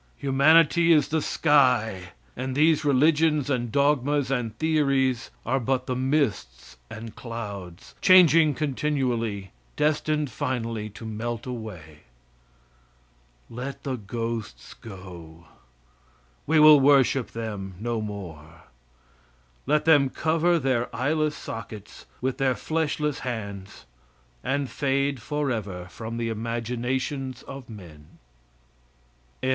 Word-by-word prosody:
Humanity 160 +5 +4
is 150 -4 +4
the 160 0 0
sky, 125 - +2 0.2
and 130 0 -4
these 155 +1 +3
religions 150 +1 +3
and 120 -3 -1
dogmas 140 0 +1
and 115 -5 -2
theories 140 -5 +1 0.2
are 130 +4 +1
but 130 +1 -1
the 130 - -2
mists 130 - -1
and 110 0 -9
clouds, 100 -7 -8
changing 165 -5 +6
continually, 125 - -2 0.2
destined 150 -1 0
finally 115 -3 -3
to 110 +2 -11
melt 115 +1 -4
away. 105 - -8 1.5
Let 125 +4 -7
the 135 -2 -2
ghosts 115 - -5
go. 85 -5 -12 1.0
We 160 +1 +4
will 155 -1 +9
worship 135 -2 +4
them 105 -5 -6
no 115 0 -2
more. 85 -6 -8 1.0
Let 150 +1 +2
them 145 -4 +5
cover 165 +4 +1
their 130 -5 0
eyeless 150 +4 0
sockets 110 -2 -9
with 130 +1 -2
their 130 -2 +2
fleshless 150 -2 -1
hands, 100 - -6 0.6
and 140 0 -1
fade 140 -1 -1
forever 115 - -3
from 115 +3 -6
the 115 -1 -2
imaginations 125 +3 -3
of 135 -3 -10
men. 85 -9 -13
125 Hz, 105 wpm, -25 LUFS, 110-145 Hz, 1.5 s, will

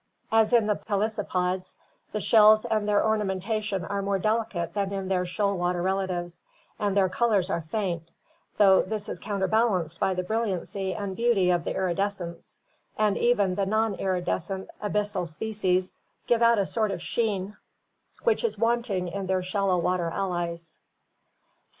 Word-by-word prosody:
As 225 0 +4
in 235 -3 +5
the 210 -1 +1
pelecypods, 195 -4 -2 0.3
the 215 - -2
shells 215 0 +6
and 215 -1 0
their 205 -1 +3
ornamentation 210 -2 -1
are 200 +4 -2
more 195 0 0
delicate 215 -4 -1
than 200 -1 -1
in 195 -1 -3
their 180 -1 0
shoal 200 +2 0
water 175 -1 -1
relatives, 180 -2 -2 0.4
and 200 -1 0
their 195 -1 +4
colors 200 -2 +1
are 170 - 0
faint, 175 -5 -2 0.5
"though 195 -2 +6
often - - -1
this 215 -1 -3
is - - -5
counterbalanced 195 -4 0
by 190 - +1
the 180 - -1
brilliancy 195 -2 -2
and 200 -2 -4
beauty 220 -6 +3
of 175 -2 0
the - - -2
iridescence, 185 -2 -3 0.4
and 210 -2 +2
even 205 -6 +2
the 195 +1 -1
non 220 +1 +1
iridescent 185 0 -2
abyssal 205 -3 -1
species 185 +1 -1 0.3
give 235 -1 +2
out 235 0 +5
a 200 - +2
sort 220 0 0
of 190 -2 -3
sheen, 205 0 -2 0.7
which 465 -1 +2
is 465 - -1
wanting 230 -6 0
in 195 +2 -4
their 185 -1 0
shallow 190 0 +1
water 175 0 0
allies" 170 -3 -3
(Grabau). - - -46
195 Hz, 160 wpm, -26 LUFS, 180-215 Hz, 0.7 s, shells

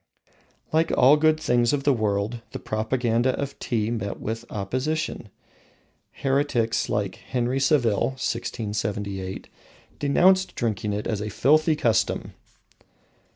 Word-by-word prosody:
Like 160 +1 +3
all 135 +4 +7
good 155 +1 +3
things 120 -4 +2
of 140 -1 0
the 140 - +4
world, 110 0 -1
the - - -4
propaganda 120 +2 0
of 140 -1 -4
Tea 110 -2 -1
met 105 -4 -3
with 115 +2 -4
opposition. 130 +4 -3 0.8
Heretics 135 -5 0
like 100 -3 -1
Henry 125 +1 -2
Saville 130 -3 +2
(1678) 105 -5 -3 0.5
denounced 185 +6 +3
drinking 105 -3 -1
it 105 +1 -3
as 105 -3 -2
a 105 - -3
filthy 155 - +3
custom. 110 -6 0
120 Hz, 115 wpm, -25 LUFS, 105-140 Hz, 0.8 s, all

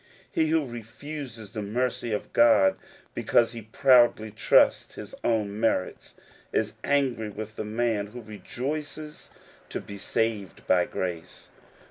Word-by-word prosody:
He 160 - +2
who 160 -1 +2
refuses 120 -1 -8
the 110 -1 -4
mercy 120 +3 -1
of 105 - -3
God 115 -5 +5 0.4
because 115 - +2
he 115 -1 -7
proudly 120 -1 +4
trusts - - +3
his - - -9
own 105 -3 0
merits, 110 -5 -1 0.4
is - - 0
angry 130 -6 +1
with 110 +1 -7
the 110 - -4
man 110 -1 0
who 120 +4 -9
rejoices 145 +8 -6 0.4
to - - -3
be 100 - -9
saved 105 -1 -2
by 90 -1 +3
grace. 85 -3 -5
115 Hz, 130 wpm, -27 LUFS, 105-125 Hz, 0.4 s, God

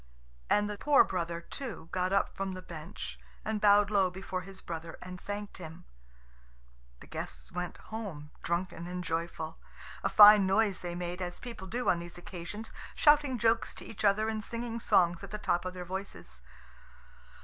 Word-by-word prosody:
And 205 0 +3
the 210 -1 -5
poor 295 -2 +6
brother 170 -2 -2
too 230 -4 -6
got 185 0 0
up 195 - +1
from 195 0 -2
the 185 0 -7
bench, 170 +3 -7 0.3
and 215 -1 -1
bowed 205 0 +6
low 195 -3 +4
before 185 0 -4
his 190 +1 -9
brother 165 -1 -6
and 180 0 -8
thanked 205 0 -5
him. 165 +1 -9 1.2
The - - -10
guests - - -7
went 180 0 -4
home, 185 -10 -7
drunken 170 0 -2
and 180 0 -4
joyful. 165 -1 -3 0.4
A - - +2
fine 205 -2 +9
noise 200 0 +3
they 175 -1 -5
made, 175 +1 -4
as 175 -1 -4
people 235 -6 -7
do 245 +5 -2
on 170 - +4
these 170 +1 -8
occasions, 180 +5 -7 0.2
shouting 295 -4 +5
jokes 230 0 +2
to - - -9
each 220 - -7
other 210 +2 +4
and 220 -1 -2
singing 230 0 -4
songs 175 -4 +3
at 200 - -7
the 210 - -4
top 175 -4 0
of 185 0 -4
their 180 -1 -5
voices. 190 +2 -7
190 Hz, 175 wpm, -31 LUFS, 175-210 Hz, 1.2 s, fine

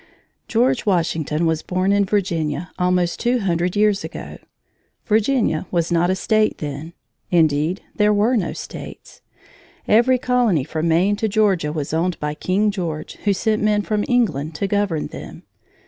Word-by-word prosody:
George 250 +2 +1
Washington 165 -3 0
was 160 -1 +1
born 185 +2 0
in 200 0 +3
Virginia 175 -5 -1
almost 180 -1 +1
two 245 +1 +1
hundred 175 -1 0
years 205 -1 +2
ago. - - -8 0.7
Virginia 215 - +1
was 170 -1 -1
not 170 +1 +2
a 185 - +2
state 215 +3 +1
then. 150 +3 -6 0.4
Indeed, 160 +1 +2
there 210 0 +3
were 210 +5 +2
no 190 -7 0
states. - - -9 0.7
Every 240 +4 +4
colony 245 - +1
from 155 +3 -2
Maine 180 +5 +2
to 220 +1 0
Georgia 195 -7 +1
was 150 -1 -4
owned 170 +2 0
by 150 0 -2
King 200 +7 0
George, 165 -6 -4
who 205 - +3
sent 215 +2 0
men 210 -1 +2
from 210 -1 -1
England 165 - 0
to 200 - -2
govern 200 -5 0
them. - - -9
185 Hz, 155 wpm, -21 LUFS, 165-210 Hz, 0.7 s, Every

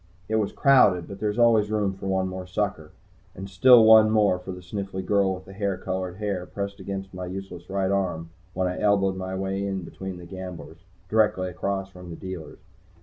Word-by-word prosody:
It 110 - 0
was 105 -2 0
crowded, 105 - +4
but 100 - -9
there's 105 +1 -1
always 115 -3 +4
room 105 -3 0
for 95 0 -7
one 95 -1 0
more 95 0 -6
sucker. 90 -5 -2 0.5
And 95 +1 -7
still 115 +5 +7
one 110 -1 +8
more, 105 -4 +3
for 90 +1 -7
the 90 0 -8
sniffly 95 0 -5
girl 100 -1 +2
with 95 0 -12
the 95 - -12
hair 100 -1 -2
colored 95 -1 -4
hair 100 -3 -3
pressed 100 0 -5
in - - -11
against 95 -1 -5
my 90 0 -6
useless 95 -1 -8
right 95 0 0
arm 85 -4 -1 0.2
when 95 0 0
I 90 - -3
elbowed 100 -2 +2
my 95 0 -4
way 95 +1 -2
in 95 -2 -3
between 95 +2 -7
the 90 - -10
gamblers, 90 -2 -8 0.3
directly 105 -3 +2
across 95 +2 -3
from 90 -1 -11
the 85 - -6
dealers. 90 -4 -8
95 Hz, 205 wpm, -25 LUFS, 90-100 Hz, 0.5 s, one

